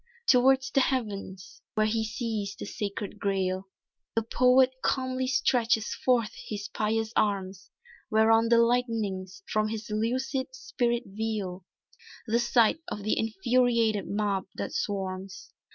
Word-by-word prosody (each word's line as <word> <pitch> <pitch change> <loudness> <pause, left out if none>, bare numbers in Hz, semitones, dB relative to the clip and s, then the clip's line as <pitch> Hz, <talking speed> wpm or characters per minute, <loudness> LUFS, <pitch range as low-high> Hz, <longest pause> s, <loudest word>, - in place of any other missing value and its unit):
Towards 265 +2 +4
the 275 - +3
Heavens 205 -8 -3
where 215 0 +3
he 220 +1 0
sees 215 -2 -3
the - - -7
sacred 205 0 -5
grail 190 -1 -1 0.5
The 225 - +2
poet 255 +3 +4
calmly 260 -1 0
stretches 235 -3 +2
forth 240 -4 +1
his 205 -2 -5
pious 220 +1 -1
arms, 195 -2 -1 0.4
Whereon 225 +1 +4
the 235 - +5
lightenings 225 -6 0
from 215 0 +1
his 215 -1 -5
lucid 260 - -1
spirit 240 - -1
veil 195 -3 -4 0.6
The 230 0 +1
sight 240 +4 +3
of 205 - -5
the 215 - +1
infuriated 225 -1 +1
mob 200 -2 -1
that - - -4
swarms. 190 -1 -4
220 Hz, 125 wpm, -28 LUFS, 200-245 Hz, 0.6 s, the